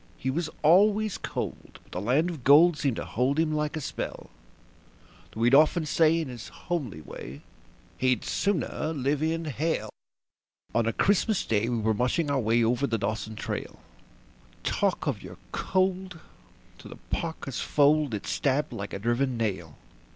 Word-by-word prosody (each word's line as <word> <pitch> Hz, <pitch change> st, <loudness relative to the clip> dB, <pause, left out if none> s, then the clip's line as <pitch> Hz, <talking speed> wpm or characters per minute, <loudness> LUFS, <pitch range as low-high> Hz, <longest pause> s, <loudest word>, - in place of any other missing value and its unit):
He 130 Hz, -, -2 dB
was 160 Hz, +3 st, -2 dB
always 205 Hz, +6 st, +4 dB
cold, -, -, -5 dB
but -, -, -26 dB
the 90 Hz, -, -4 dB
land 140 Hz, -, +2 dB
of 155 Hz, -7 st, -8 dB
gold 155 Hz, +5 st, +7 dB
seemed 140 Hz, -5 st, 0 dB
to -, -, -4 dB
hold 130 Hz, +4 st, 0 dB
him 160 Hz, -1 st, +1 dB
like 150 Hz, 0 st, -1 dB
a -, -, -2 dB
spell; 145 Hz, -, -6 dB, 1.0 s
Though 115 Hz, -, -3 dB
he'd 120 Hz, +2 st, +4 dB
often 155 Hz, +3 st, +5 dB
say 160 Hz, +2 st, +3 dB
in 160 Hz, -, -3 dB
his 120 Hz, -3 st, -8 dB
homely 135 Hz, -, -4 dB
way 70 Hz, -2 st, -9 dB, 0.6 s
that 130 Hz, -, +1 dB
he'd 125 Hz, -3 st, +1 dB
"sooner 165 Hz, -4 st, -1 dB
live 140 Hz, +1 st, 0 dB
in 165 Hz, +1 st, -1 dB
hell". 145 Hz, -7 st, -2 dB, 0.8 s
On 115 Hz, -1 st, +2 dB
a -, -, +2 dB
Christmas 205 Hz, -, +1 dB
Day 110 Hz, +1 st, +1 dB
we 120 Hz, -, 0 dB
were 110 Hz, 0 st, +1 dB
mushing 125 Hz, +7 st, 0 dB
our 140 Hz, -, +2 dB
way 115 Hz, 0 st, +2 dB
over 125 Hz, +4 st, +1 dB
the 115 Hz, -, 0 dB
Dawson 110 Hz, 0 st, -3 dB
trail. 105 Hz, -, -5 dB, 0.9 s
Talk -, -, 0 dB
of -, -, -2 dB
your -, -, -10 dB
cold! 185 Hz, -1 st, 0 dB, 0.6 s
through -, -, -11 dB
the -, -, -11 dB, 0.2 s
parka's 160 Hz, -6 st, -4 dB
fold 145 Hz, -3 st, +3 dB
it 100 Hz, -, -6 dB
stabbed 140 Hz, +1 st, 0 dB
like 100 Hz, 0 st, -6 dB
a -, -, -2 dB
driven 120 Hz, +4 st, 0 dB
nail. 95 Hz, -9 st, -3 dB
140 Hz, 170 wpm, -27 LUFS, 115-160 Hz, 1.0 s, gold